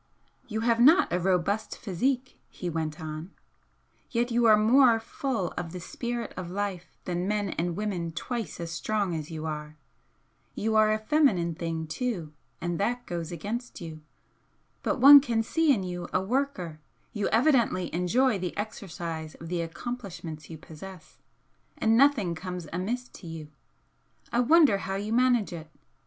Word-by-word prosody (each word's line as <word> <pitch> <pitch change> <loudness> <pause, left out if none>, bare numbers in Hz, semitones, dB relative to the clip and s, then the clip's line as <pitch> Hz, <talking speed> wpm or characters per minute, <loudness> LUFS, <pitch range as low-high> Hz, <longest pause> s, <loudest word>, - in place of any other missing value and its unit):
"You 220 -1 -3
have 230 0 +2
not 310 +10 +6
a 180 - +2
robust 190 +4 0
physique," 250 +7 -2
he 175 -2 -5
went 155 -1 -3
on 155 +2 -6 0.8
"Yet 240 0 0
you 235 0 +3
are 215 -1 +7
more 230 +2 +5
full 225 -4 -3
of 170 -1 -5
the 180 - -5
spirit 235 +6 -4
of 180 -1 -5
life 185 -3 -4
than 180 +1 -2
men 205 -1 0
and 170 +1 -2
women 185 -5 -2
twice 220 +4 -4
as 170 -1 -5
strong 200 +2 -1
as 155 -2 -4
you 160 -1 -5
are. 150 -1 -5 0.8
You 220 +1 0
are 215 0 +5
a 215 - +2
feminine 215 - +2
thing, 165 0 -3
too, 165 -2 -3 0.3
and 175 -1 -2
that 245 +4 -1
goes 170 -1 -4
against 215 +9 -5
you. 160 -2 -8 0.8
But - - -1
one 280 +2 +11
can 230 -4 0
see 320 +6 +2
in 215 -8 +2
you 175 -1 -5
a - - +2
worker 190 - -2 0.3
you 205 -2 -1
evidently 235 - +2
enjoy 200 +7 +2
the 180 -1 -4
exercise 170 -7 -5
of 165 - -10
the 175 -1 -1
accomplishments 170 -4 -6
you 160 - -7
possess 165 +3 -12 0.6
and 225 0 +3
nothing 240 -9 +4
comes 180 -1 -6
amiss 235 +8 -2
to 175 - -12
you. 160 -2 -7 0.8
I 235 - +1
wonder 270 -4 +5
how 195 - -3
you 205 +3 -2
manage 245 -5 +3
it? 160 -2 -8
195 Hz, 160 wpm, -28 LUFS, 170-235 Hz, 0.8 s, one